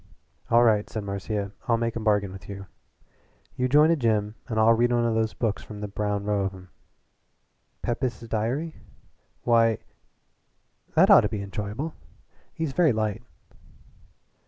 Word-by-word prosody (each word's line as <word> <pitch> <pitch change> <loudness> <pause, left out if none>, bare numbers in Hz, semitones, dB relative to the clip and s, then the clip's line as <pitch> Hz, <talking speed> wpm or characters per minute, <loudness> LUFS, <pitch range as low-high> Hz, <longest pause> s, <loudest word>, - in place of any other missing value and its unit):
"All 120 +1 +5
right," 110 -3 +3
said 110 - -4
Marcia. 100 0 -3 0.2
"I'll 115 -1 +3
make 115 -1 -2
a - - -2
bargain 105 -3 +1
with 95 0 -11
you. 100 -1 -7 0.9
You 125 0 0
join 150 +4 +6
a - - +4
gym 110 -6 0
and 110 -3 -1
I'll 110 +1 +6
read 120 +1 +2
one 120 -1 +2
of 115 - +1
those 110 -1 0
books 110 -4 -1
from 105 -1 -10
the 105 - -4
brown 105 0 -2
row 105 -1 0
of 95 0 -2
'em." 95 -1 -14 1.1
"'Pepys' 120 0 -2
Diary'? 125 +10 -2 0.7
Why, 115 -2 +4 1.2
that - - +6
ought - - +9
to - - -1
be 105 -2 -4
enjoyable. 105 - -4 0.6
He's 160 -4 -3
very 165 -5 +4
light." 110 0 -1
110 Hz, 160 wpm, -26 LUFS, 105-120 Hz, 1.2 s, ought